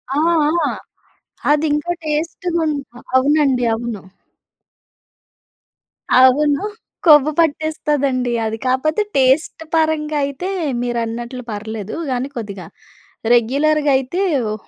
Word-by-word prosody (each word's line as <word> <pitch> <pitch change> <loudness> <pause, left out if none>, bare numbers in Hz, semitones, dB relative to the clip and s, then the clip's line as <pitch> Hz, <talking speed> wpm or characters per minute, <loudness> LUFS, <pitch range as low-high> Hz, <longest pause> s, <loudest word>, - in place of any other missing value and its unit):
ఆ! - - 0 0.5
ఆ! - - 0 0.8
అది 300 +1 +3
ఇంకా 300 +4 -1
టేస్ట్‌గుంట్ 315 0 -1
ఆ! - - -11 0.2
అవునండి. 270 -2 +3
అవును. 225 -3 -5 2.1
అవును. 280 +5 +4 0.4
కొవ్వు 300 -2 +7
పట్టేస్తదండి. 290 -5 0
అది 220 0 -3
కాపోతే, 310 +9 +1 0.2
టేస్ట్ 270 +5 +2
పరంగా 310 -1 +1
అయితే, 280 +6 -5 0.3
మీరన్నట్లు 240 +1 -3
పర్లేదు. 215 0 -5 0.2
గానీ 250 +1 -1
కొద్దిగా 200 -5 -6 0.7
రెగ్యులర్‌‌‌గా 285 +5 +2
అయితే, 270 +8 -3 0.3
ఒ - - -2
280 Hz, 95 wpm, -19 LUFS, 245-310 Hz, 2.1 s, కొవ్వు